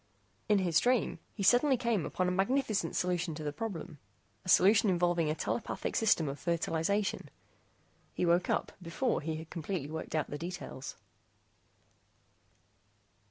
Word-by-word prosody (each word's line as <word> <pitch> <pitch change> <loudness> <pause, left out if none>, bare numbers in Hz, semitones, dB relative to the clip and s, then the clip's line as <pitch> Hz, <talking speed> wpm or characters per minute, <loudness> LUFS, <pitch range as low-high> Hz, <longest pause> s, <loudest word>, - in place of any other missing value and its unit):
In 210 - +5
his 175 -4 +3
dream 245 -8 +1 0.2
he 200 - -3
suddenly 250 +6 +5
came 235 -7 0
upon 185 - -1
a - - +1
magnificent 200 - 0
solution 180 -2 -1
to 155 - -6
the 145 -1 -3
problem, 165 -5 -6 0.4
a - - -7
solution 205 +4 +6
involving 175 -3 +2
a 155 - 0
telepathic 225 - -3
system 205 -8 +3
of 140 0 -4
fertilization. 170 +5 -1 0.9
He - - 0
woke 175 +1 +2
up - - 0
before 185 +9 -1
he 160 +1 -3
had 160 +1 -8
completely 165 -3 -4
worked 160 0 -5
out 155 - -1
the 145 - -4
details. 175 -6 -6
180 Hz, 145 wpm, -32 LUFS, 160-205 Hz, 0.9 s, solution